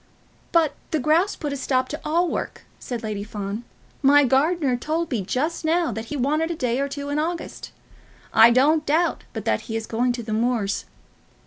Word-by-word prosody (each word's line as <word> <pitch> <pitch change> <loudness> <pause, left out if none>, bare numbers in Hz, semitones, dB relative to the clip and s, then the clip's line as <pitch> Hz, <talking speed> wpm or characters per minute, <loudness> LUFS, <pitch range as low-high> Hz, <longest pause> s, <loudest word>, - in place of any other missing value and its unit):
"But 330 -3 +3 0.2
the 315 - 0
grouse 320 +8 +2
put 295 -3 -4
a - - -2
stop 260 -1 0
to 300 - -5
all 340 +4 +1
work," - - -4 0.2
said 240 -3 -5
Lady 210 -2 -3
Fawn. 210 +1 -5 0.4
"My 290 +1 +6
gardener 275 +1 +2
told 315 +6 -2
me 235 -5 0
just 300 - -2
now 330 +1 +1
that 220 +1 -5
he 295 +5 -5
wanted 305 +5 +1
a 340 - -2
day 250 -3 -1
or 280 0 -1
two 285 0 -5
in 290 +1 0
August. 335 +2 -4 0.6
I 225 +1 +8
don't 290 +6 +4
doubt 320 +3 +1
but - - -6
that - - +1
he 225 - -2
is 225 -1 -2
going 245 +3 0
to 240 -1 -5
the 220 -1 -4
moors. 225 -3 0
280 Hz, 200 wpm, -23 LUFS, 235-315 Hz, 0.6 s, I